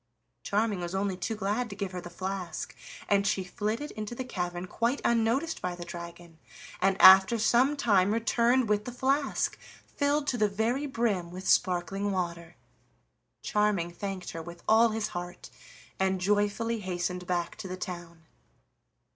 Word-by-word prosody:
Charming 210 Hz, -1 st, 0 dB
was 175 Hz, +1 st, -4 dB
only 195 Hz, -1 st, 0 dB
too 220 Hz, +4 st, -3 dB
glad 215 Hz, +4 st, -1 dB
to 200 Hz, -, -7 dB
give 200 Hz, -2 st, -4 dB
her 180 Hz, -1 st, -5 dB
the 175 Hz, -, -9 dB
flask, 185 Hz, -1 st, -5 dB, 0.3 s
and 200 Hz, -1 st, +2 dB
she 195 Hz, -2 st, +1 dB
flitted 215 Hz, +9 st, -3 dB
into 215 Hz, +2 st, -6 dB
the 260 Hz, -, -4 dB
cavern 180 Hz, -6 st, -4 dB
quite 235 Hz, +8 st, -1 dB
unnoticed 235 Hz, +8 st, +1 dB
by 180 Hz, -1 st, -2 dB
the 175 Hz, 0 st, -8 dB
dragon, 170 Hz, -1 st, -9 dB, 0.4 s
and 195 Hz, 0 st, +2 dB
after 190 Hz, +4 st, +9 dB
some 245 Hz, +6 st, +3 dB
time 200 Hz, -6 st, +3 dB
returned 235 Hz, +2 st, +2 dB
with 210 Hz, 0 st, +1 dB
the 245 Hz, -, -5 dB
flask, 270 Hz, +3 st, 0 dB, 0.3 s
filled 285 Hz, 0 st, 0 dB
to 245 Hz, -4 st, -1 dB
the 210 Hz, -1 st, +3 dB
very 235 Hz, +8 st, -1 dB
brim 220 Hz, -9 st, -1 dB
with 185 Hz, +2 st, -7 dB
sparkling 190 Hz, +3 st, +1 dB
water. 170 Hz, -2 st, -3 dB, 0.9 s
Charming 210 Hz, -5 st, +1 dB
thanked 190 Hz, +1 st, -5 dB
her 165 Hz, -, -6 dB
with 170 Hz, +1 st, -10 dB
all 225 Hz, +2 st, +6 dB
his 220 Hz, -1 st, -2 dB
heart, 175 Hz, 0 st, -7 dB, 0.5 s
and 190 Hz, 0 st, +1 dB
joyfully 205 Hz, +4 st, +1 dB
hastened 180 Hz, -1 st, -3 dB
back 175 Hz, -1 st, -1 dB
to 220 Hz, -3 st, -7 dB
the 185 Hz, 0 st, -5 dB
town. 175 Hz, -3 st, -7 dB
200 Hz, 160 wpm, -29 LUFS, 180-230 Hz, 0.9 s, after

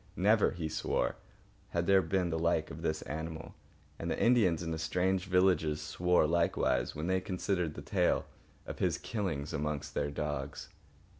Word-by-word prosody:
Never, 105 Hz, +3 st, +4 dB
he 80 Hz, -2 st, -4 dB
swore, 80 Hz, -, -1 dB, 0.5 s
had 85 Hz, 0 st, -1 dB
there 95 Hz, 0 st, +5 dB
been 90 Hz, -2 st, 0 dB
the 80 Hz, -, -1 dB
like 85 Hz, -1 st, +1 dB
of 75 Hz, +3 st, -8 dB
this 80 Hz, -2 st, -1 dB
animal; 80 Hz, +1 st, -6 dB, 0.5 s
and -, -, -3 dB
the -, -, -1 dB
Indians 105 Hz, -9 st, +3 dB
in 80 Hz, -1 st, -2 dB
strange 90 Hz, +4 st, 0 dB
villages 90 Hz, -5 st, +3 dB
swore 90 Hz, +3 st, +2 dB
likewise 75 Hz, -6 st, +1 dB
when 75 Hz, -, -3 dB
they 95 Hz, +1 st, +1 dB
considered 90 Hz, -3 st, -1 dB
the -, -, -7 dB
tale -, -, +1 dB, 0.4 s
of -, -, -7 dB
his -, -, +1 dB
killings 85 Hz, -9 st, -3 dB
amongst 75 Hz, -1 st, -3 dB
their 70 Hz, -, -1 dB
dogs. 75 Hz, -1 st, -4 dB
85 Hz, 160 wpm, -32 LUFS, 75-95 Hz, 0.5 s, there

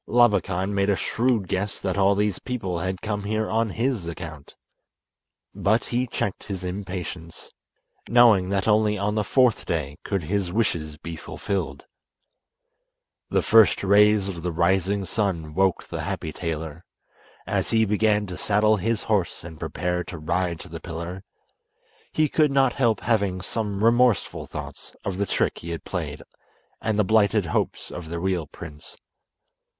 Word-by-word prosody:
Labakan 100 Hz, -5 st, +3 dB
made 100 Hz, 0 st, +1 dB
a 100 Hz, -, +4 dB
shrewd 115 Hz, +2 st, 0 dB
guess 100 Hz, +3 st, -2 dB
that 95 Hz, -, -2 dB
all 100 Hz, 0 st, +4 dB
these 105 Hz, 0 st, 0 dB
people 95 Hz, -9 st, -3 dB
had 95 Hz, +1 st, -3 dB
come 105 Hz, -1 st, -2 dB
here 110 Hz, +1 st, 0 dB
on 110 Hz, 0 st, +1 dB
his 115 Hz, -3 st, -1 dB
account; 80 Hz, -4 st, -8 dB, 1.0 s
but 110 Hz, +3 st, +1 dB
he 125 Hz, +1 st, -1 dB
checked 100 Hz, -4 st, -3 dB
his 95 Hz, -3 st, -5 dB
impatience, 90 Hz, -3 st, -6 dB, 0.6 s
knowing 115 Hz, -6 st, +6 dB
that 100 Hz, 0 st, 0 dB
only 105 Hz, -1 st, +3 dB
on 105 Hz, +1 st, 0 dB
the 105 Hz, -1 st, +1 dB
fourth 125 Hz, 0 st, +3 dB
day 75 Hz, -3 st, -2 dB
could 100 Hz, -4 st, -2 dB
his 95 Hz, +2 st, -1 dB
wishes 85 Hz, -8 st, -1 dB
be 85 Hz, +2 st, -7 dB
fulfilled. 80 Hz, -3 st, -4 dB, 1.4 s
The -, -, +1 dB
first 110 Hz, -3 st, +5 dB
rays 105 Hz, 0 st, +5 dB
of 90 Hz, -4 st, -5 dB
the 90 Hz, +1 st, -2 dB
rising 95 Hz, +4 st, +1 dB
sun 90 Hz, -8 st, -1 dB
woke 95 Hz, +2 st, +2 dB
the -, -, -5 dB
happy 80 Hz, -, -4 dB
tailor. 80 Hz, 0 st, -4 dB, 0.6 s
As -, -, -1 dB
he 110 Hz, -1 st, +3 dB
began 105 Hz, 0 st, +2 dB
to 90 Hz, -2 st, -7 dB
saddle 105 Hz, +1 st, +3 dB
his 110 Hz, +2 st, -1 dB
horse 100 Hz, -6 st, 0 dB
and 80 Hz, -2 st, -10 dB
prepare 90 Hz, 0 st, -2 dB
to 90 Hz, -, -7 dB
ride 85 Hz, +2 st, -1 dB
to -, -, -10 dB
the -, -, -7 dB
pillar, 85 Hz, +3 st, -6 dB, 0.9 s
he 155 Hz, -1 st, +2 dB
could 150 Hz, +1 st, +3 dB
not 135 Hz, -2 st, +3 dB
help 115 Hz, -6 st, +1 dB
having 100 Hz, -5 st, +1 dB
some 105 Hz, +1 st, -3 dB
remorseful 120 Hz, -2 st, +3 dB
thoughts -, -, -8 dB
of 95 Hz, -1 st, -3 dB
the 100 Hz, -, 0 dB
trick -, -, 0 dB
he 85 Hz, -, -8 dB
had 85 Hz, -3 st, -4 dB
played -, -, -4 dB, 0.6 s
and 110 Hz, -1 st, 0 dB
the 105 Hz, -, +4 dB
blighted 105 Hz, -1 st, +3 dB
hopes 85 Hz, -, -2 dB
of 85 Hz, -3 st, -7 dB
the 85 Hz, -, -3 dB
real 90 Hz, -3 st, -1 dB
prince. 75 Hz, +1 st, -11 dB
100 Hz, 160 wpm, -25 LUFS, 90-110 Hz, 1.4 s, knowing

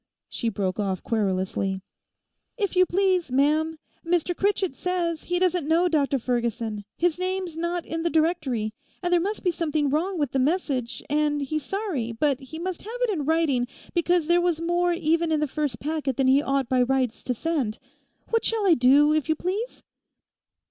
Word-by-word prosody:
she 230 Hz, -, -2 dB
broke 195 Hz, -2 st, -2 dB
off 195 Hz, -3 st, -1 dB
querulously. 190 Hz, -2 st, -1 dB, 0.8 s
'If 405 Hz, -5 st, -1 dB
you 365 Hz, 0 st, +5 dB
please, 370 Hz, -5 st, +1 dB
ma'am, 305 Hz, +4 st, +2 dB, 0.3 s
Mr 350 Hz, 0 st, 0 dB
Critchett 390 Hz, -4 st, +1 dB
says 340 Hz, 0 st, -2 dB
he 355 Hz, -, 0 dB
doesn't 360 Hz, -4 st, +1 dB
know 335 Hz, +3 st, +3 dB
Dr 285 Hz, -4 st, +1 dB
Ferguson, 230 Hz, -4 st, -2 dB
his 350 Hz, 0 st, +1 dB
name's 370 Hz, -2 st, -2 dB
not 340 Hz, +1 st, -2 dB
in 325 Hz, 0 st, -3 dB
the 340 Hz, -, +1 dB
Directory, 305 Hz, -10 st, 0 dB, 0.3 s
and 355 Hz, 0 st, +1 dB
there 345 Hz, -, +4 dB
must 410 Hz, +4 st, -3 dB
be 360 Hz, -, +2 dB
something 305 Hz, -4 st, 0 dB
wrong 350 Hz, +6 st, 0 dB
with 290 Hz, -5 st, -1 dB
the 270 Hz, -, 0 dB
message, 265 Hz, -5 st, -1 dB
and 295 Hz, 0 st, +1 dB
he's 310 Hz, +3 st, -2 dB
sorry, 330 Hz, -, -3 dB
but 275 Hz, +3 st, +1 dB
he 280 Hz, +3 st, -9 dB
must 355 Hz, +1 st, -4 dB
have 460 Hz, +4 st, -7 dB
it -, -, +2 dB
in 310 Hz, -8 st, -2 dB
writing 300 Hz, -6 st, +2 dB, 0.3 s
because 345 Hz, -1 st, +2 dB
there 345 Hz, +2 st, +3 dB
was 345 Hz, -2 st, +1 dB
more 345 Hz, +1 st, +1 dB
even 335 Hz, -1 st, +1 dB
in 310 Hz, -, +2 dB
the 300 Hz, -, +1 dB
first 285 Hz, -4 st, -2 dB
packet 295 Hz, -4 st, -2 dB
than 270 Hz, -, +2 dB
he 265 Hz, +2 st, +5 dB
ought 275 Hz, -3 st, 0 dB
by 255 Hz, 0 st, +2 dB
rights 255 Hz, -2 st, 0 dB
to 250 Hz, -, -1 dB
send. 265 Hz, -6 st, -1 dB, 0.5 s
What 455 Hz, -1 st, +2 dB
shall 445 Hz, -2 st, +1 dB
I 370 Hz, -, +6 dB
do, 290 Hz, +2 st, +5 dB
if 310 Hz, 0 st, 0 dB
you 315 Hz, -, +3 dB
please? 395 Hz, +9 st, -4 dB
315 Hz, 185 wpm, -25 LUFS, 265-350 Hz, 0.8 s, I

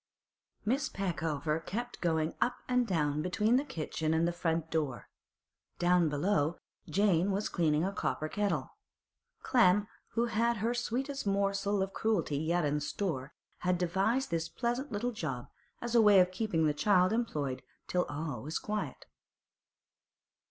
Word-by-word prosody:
Miss 265 Hz, +5 st, +1 dB
Peckover 160 Hz, -5 st, -1 dB
kept 240 Hz, +7 st, -5 dB
going 160 Hz, -2 st, +1 dB
up 245 Hz, -, +2 dB
and 250 Hz, -1 st, +2 dB
down 150 Hz, -5 st, +1 dB
between 210 Hz, +8 st, +2 dB
the 275 Hz, -, +1 dB
kitchen 160 Hz, -, -2 dB
and 165 Hz, +1 st, +2 dB
the -, -, +1 dB
front 165 Hz, -2 st, -1 dB
door. 145 Hz, -8 st, -2 dB, 0.7 s
Down 175 Hz, -2 st, +3 dB
below, 155 Hz, +1 st, +1 dB, 0.3 s
Jane 195 Hz, -2 st, +3 dB
was 200 Hz, +1 st, -1 dB
cleaning 155 Hz, -3 st, +2 dB
a 195 Hz, -, -1 dB
copper 155 Hz, -, -1 dB
kettle. 205 Hz, +4 st, -1 dB, 0.7 s
Clem, 210 Hz, -5 st, +4 dB, 0.3 s
who 235 Hz, +1 st, +2 dB
had 235 Hz, 0 st, +1 dB
her 225 Hz, +4 st, 0 dB
sweetest 250 Hz, +2 st, -2 dB
morsel 200 Hz, 0 st, +1 dB
of 195 Hz, -, -5 dB
cruelty 185 Hz, -10 st, 0 dB
yet 165 Hz, +1 st, +1 dB
in 145 Hz, +1 st, +1 dB
store, 150 Hz, -2 st, -3 dB, 0.3 s
had 180 Hz, 0 st, +1 dB
devised 195 Hz, +9 st, +1 dB
this 165 Hz, 0 st, -1 dB
pleasant 240 Hz, +8 st, -2 dB
little 230 Hz, +4 st, -1 dB
job 145 Hz, -, -4 dB, 0.3 s
as 240 Hz, -1 st, -3 dB
a 235 Hz, -, +6 dB
way 205 Hz, -3 st, +7 dB
of 180 Hz, 0 st, +4 dB
keeping 185 Hz, -5 st, 0 dB
the 150 Hz, -, +3 dB
child 185 Hz, +5 st, +3 dB
employed 145 Hz, -, -1 dB, 0.3 s
till 180 Hz, 0 st, +1 dB
all 145 Hz, -5 st, -4 dB
was 155 Hz, +6 st, -3 dB
quiet. 210 Hz, 0 st, -4 dB
180 Hz, 150 wpm, -32 LUFS, 160-220 Hz, 0.7 s, way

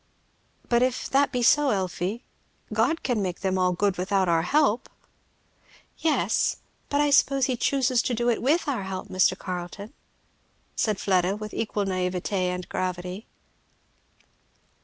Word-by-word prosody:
"But 235 Hz, 0 st, +2 dB
if 255 Hz, 0 st, 0 dB
that 280 Hz, +1 st, +3 dB
be 250 Hz, -2 st, -1 dB
so, 290 Hz, +4 st, +5 dB
Elfie, 190 Hz, +2 st, -2 dB, 0.5 s
God 330 Hz, -1 st, +1 dB
can 245 Hz, -5 st, 0 dB
make 180 Hz, -2 st, -3 dB
them 190 Hz, -1 st, 0 dB
all 180 Hz, 0 st, +3 dB
good 185 Hz, 0 st, 0 dB
without 190 Hz, 0 st, +1 dB
our 165 Hz, -1 st, +3 dB
help?" 275 Hz, -, +1 dB, 1.1 s
"Yes, 320 Hz, -2 st, +1 dB, 0.3 s
but 285 Hz, -, +1 dB
I 295 Hz, 0 st, +3 dB
suppose 275 Hz, -1 st, +4 dB
he 255 Hz, -, 0 dB
chooses 255 Hz, 0 st, +1 dB
to 245 Hz, -, -1 dB
do 240 Hz, +1 st, -1 dB
it 235 Hz, -, +1 dB
with 300 Hz, +7 st, +1 dB
our 270 Hz, -7 st, -1 dB
help, 190 Hz, -1 st, -6 dB
Mr. 185 Hz, 0 st, +2 dB
Carleton," 185 Hz, +6 st, -6 dB, 0.8 s
said 215 Hz, -3 st, 0 dB
Fleda 185 Hz, -1 st, +1 dB
with 215 Hz, 0 st, -7 dB
equal 210 Hz, -2 st, -2 dB
naïveté 185 Hz, -1 st, -2 dB, 0.2 s
and 180 Hz, 0 st, -4 dB
gravity. 185 Hz, +2 st, -4 dB
205 Hz, 145 wpm, -25 LUFS, 185-255 Hz, 1.1 s, so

